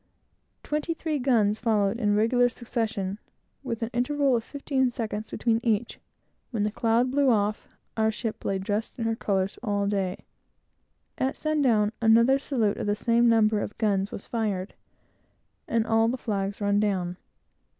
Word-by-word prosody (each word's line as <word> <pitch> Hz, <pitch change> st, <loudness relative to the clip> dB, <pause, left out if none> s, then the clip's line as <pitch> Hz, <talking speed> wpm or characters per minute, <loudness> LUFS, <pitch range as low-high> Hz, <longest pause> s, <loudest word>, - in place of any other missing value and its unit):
Twenty 305 Hz, +2 st, -2 dB
three 315 Hz, -3 st, -2 dB
guns 225 Hz, -5 st, +2 dB
followed 215 Hz, -1 st, +1 dB
in 205 Hz, -3 st, +2 dB
regular 245 Hz, +3 st, +3 dB
succession, 220 Hz, -5 st, -3 dB, 0.4 s
with 235 Hz, -4 st, -4 dB
an 230 Hz, -, -3 dB
interval 270 Hz, +2 st, +2 dB
of 230 Hz, -, -1 dB
fifteen 270 Hz, -1 st, -1 dB
seconds 220 Hz, -2 st, -4 dB
between 230 Hz, -1 st, 0 dB
each 230 Hz, -1 st, -1 dB, 0.5 s
when 225 Hz, -5 st, -1 dB
the 210 Hz, -, 0 dB
cloud 230 Hz, +3 st, +1 dB
cleared 280 Hz, 0 st, +2 dB
away, 210 Hz, -4 st, +3 dB, 0.4 s
and 220 Hz, -1 st, +2 dB
the -, -, +2 dB
ship 220 Hz, 0 st, -5 dB
lay 195 Hz, -, 0 dB
dressed 205 Hz, +3 st, -3 dB
in 230 Hz, -, -2 dB
her 225 Hz, 0 st, 0 dB
colors, 195 Hz, -3 st, -1 dB
all 205 Hz, -4 st, 0 dB
day. 195 Hz, -2 st, -2 dB, 0.9 s
At 265 Hz, +1 st, 0 dB
sun 310 Hz, -1 st, 0 dB
down, 215 Hz, -6 st, +3 dB
another 230 Hz, +4 st, +5 dB
salute 235 Hz, -7 st, 0 dB
of -, -, -3 dB
the 205 Hz, -, +2 dB
same 235 Hz, +2 st, +3 dB
number 220 Hz, -2 st, +3 dB
of -, -, -6 dB
guns 200 Hz, -3 st, 0 dB
was -, -, -7 dB
fired, 210 Hz, -5 st, -2 dB, 0.9 s
and 230 Hz, -1 st, +1 dB
all 225 Hz, 0 st, +3 dB
the 250 Hz, +3 st, -1 dB
flags 200 Hz, -4 st, -3 dB
run 205 Hz, 0 st, +2 dB
down. 185 Hz, -4 st, -1 dB
225 Hz, 165 wpm, -26 LUFS, 205-245 Hz, 0.9 s, another